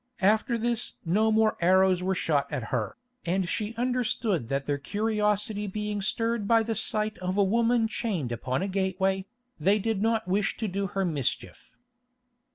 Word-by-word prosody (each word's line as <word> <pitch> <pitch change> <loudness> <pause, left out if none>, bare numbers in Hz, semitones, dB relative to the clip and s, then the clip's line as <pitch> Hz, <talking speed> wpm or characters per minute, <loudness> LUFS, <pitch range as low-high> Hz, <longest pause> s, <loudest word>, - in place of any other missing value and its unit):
After 220 +5 +3
this 235 +1 -1
no 215 +6 +2
more 220 0 +3
arrows 185 +1 +4
were 190 +1 0
shot 145 -5 0
at 115 -3 -4
her, 115 - -2 0.3
and 180 +1 0
she 215 +4 -3
understood 235 - 0
that 135 +2 -2
their 145 -1 -1
curiosity 210 +3 0
being 210 +1 -3
stirred 225 +1 0
by 225 0 +4
the 225 +1 -2
sight 215 0 -1
of 185 +1 -2
a 200 - +5
woman 230 +3 +2
chained 195 - -2
upon 130 - -2
a - - -1
gateway, 190 0 0 0.3
they 200 +2 +3
did 215 -1 -1
not 225 -1 +1
wish 195 +2 0
to 220 - -2
do 195 +1 -2
her 195 0 -1
mischief. 135 -7 -3
200 Hz, 165 wpm, -27 LUFS, 185-220 Hz, 0.3 s, a